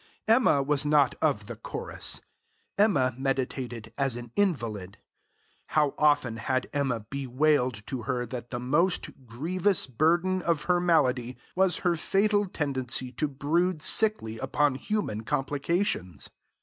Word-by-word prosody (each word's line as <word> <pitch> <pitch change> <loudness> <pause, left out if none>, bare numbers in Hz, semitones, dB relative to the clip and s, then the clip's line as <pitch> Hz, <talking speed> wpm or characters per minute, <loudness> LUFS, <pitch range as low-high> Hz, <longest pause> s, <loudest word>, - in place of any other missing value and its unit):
Emma 220 - +4
was 145 +1 +1
not 150 -2 +4
of 140 -10 +1
the 120 +2 -7
chorus. 110 - -5 0.5
Emma 145 - +3
meditated 125 -4 -3
as 135 -3 +1
an 120 -1 -8
invalid. 115 - -1 0.8
How 150 -2 +3
often 145 -6 +2
had 130 +2 -1
Emma 135 -5 0
bewailed 130 -1 0
to 130 -3 -4
her 125 +1 -2
that 120 0 -7
the 120 - -4
most, 150 +9 +1 0.2
grievous 175 - 0
burden 170 +8 +2
of 170 -3 0
her 180 -1 +2
malady 130 -8 +2 0.2
was 190 -1 +3
her 175 -1 +3
fatal 205 +5 +2
tendency 130 -6 -2
to 150 +5 -1
brood 160 +5 0
sickly 210 - +2
upon 140 +2 +1
human 135 - -2
complications! 145 - -1
140 Hz, 130 wpm, -28 LUFS, 125-170 Hz, 0.8 s, Emma